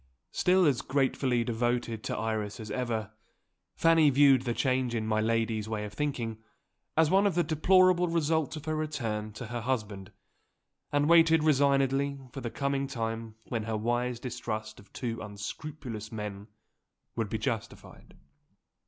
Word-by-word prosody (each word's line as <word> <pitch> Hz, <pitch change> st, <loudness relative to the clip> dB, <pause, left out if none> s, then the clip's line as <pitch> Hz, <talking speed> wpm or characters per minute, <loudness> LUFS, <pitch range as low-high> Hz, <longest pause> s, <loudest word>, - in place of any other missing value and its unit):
Still 185 Hz, 0 st, +3 dB
as 135 Hz, -6 st, +2 dB
gratefully 130 Hz, -2 st, +1 dB
devoted 120 Hz, -1 st, -1 dB
to -, -, -2 dB
Iris 110 Hz, -2 st, -2 dB
as 110 Hz, -1 st, -7 dB
ever, 115 Hz, -4 st, -2 dB, 0.6 s
Fanny 165 Hz, -2 st, +5 dB
viewed 140 Hz, -1 st, +5 dB
the 120 Hz, -, 0 dB
change 130 Hz, -2 st, 0 dB
in 110 Hz, -1 st, -1 dB
my 110 Hz, 0 st, +1 dB
lady's 110 Hz, -1 st, 0 dB
way 105 Hz, -1 st, -2 dB
of 105 Hz, -, -8 dB
thinking 120 Hz, -7 st, -3 dB, 0.6 s
as 160 Hz, -1 st, +4 dB
one 195 Hz, +2 st, +5 dB
of 195 Hz, -, -1 dB
the 175 Hz, -, +3 dB
deplorable 180 Hz, +3 st, +4 dB
results 160 Hz, -2 st, 0 dB
of 155 Hz, -, -8 dB
her 155 Hz, 0 st, -1 dB
return 115 Hz, -9 st, -3 dB
to 105 Hz, -, -7 dB
her 120 Hz, +1 st, -4 dB
husband, 105 Hz, -6 st, -3 dB, 0.8 s
and 145 Hz, 0 st, +2 dB
waited 165 Hz, -1 st, +6 dB
resignedly 140 Hz, -1 st, +2 dB
for 135 Hz, -, -7 dB
the 120 Hz, -, -3 dB
coming 140 Hz, +2 st, -1 dB
time 115 Hz, -3 st, -4 dB
when 115 Hz, -3 st, -1 dB
her 110 Hz, -1 st, -2 dB
wise 120 Hz, +2 st, -1 dB
distrust 110 Hz, -3 st, -5 dB
of 100 Hz, -, -18 dB
two 115 Hz, -3 st, -4 dB
unscrupulous 110 Hz, +2 st, -7 dB
men 105 Hz, -2 st, -6 dB, 0.7 s
would 115 Hz, -3 st, -2 dB
be 110 Hz, -, -1 dB
justified. 110 Hz, 0 st, -5 dB
120 Hz, 155 wpm, -29 LUFS, 110-145 Hz, 0.8 s, waited